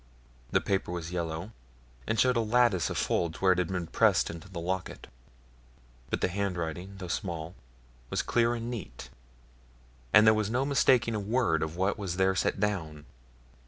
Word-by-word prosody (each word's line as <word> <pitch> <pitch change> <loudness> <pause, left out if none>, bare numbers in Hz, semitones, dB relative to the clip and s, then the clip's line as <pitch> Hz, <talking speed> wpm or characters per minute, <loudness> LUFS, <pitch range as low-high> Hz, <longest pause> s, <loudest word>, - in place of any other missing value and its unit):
The - - +2
paper 95 -3 -1
was 85 -1 -5
yellow, 85 +3 -3 0.6
and 115 0 0
showed 125 -1 +4
a - - +2
lattice 115 -5 +2
of - - -3
folds 85 -2 0
where 95 -1 +4
it 90 - +2
had 90 - +1
been 90 -2 -3
pressed - - +2
into 85 +2 -10
the 90 -3 -6
locket; 95 +2 -4 1.0
but - - -2
the - - +3
handwriting, 90 -1 -3
though 95 -2 -6
small, 85 -3 -4 0.6
was - - -1
clear 120 0 +2
and 115 0 -5
neat, 115 -6 -8 1.0
and 105 - +7
there 110 - +7
was 110 -1 0
no 130 +4 0
mistaking 130 -4 +3
a 105 - -1
word 105 -6 +1
of 80 +1 -3
what 95 +4 0
was 95 -4 -3
there 95 +1 +3
set 95 - 0
down. 80 -8 -2
95 Hz, 175 wpm, -29 LUFS, 85-110 Hz, 1.0 s, and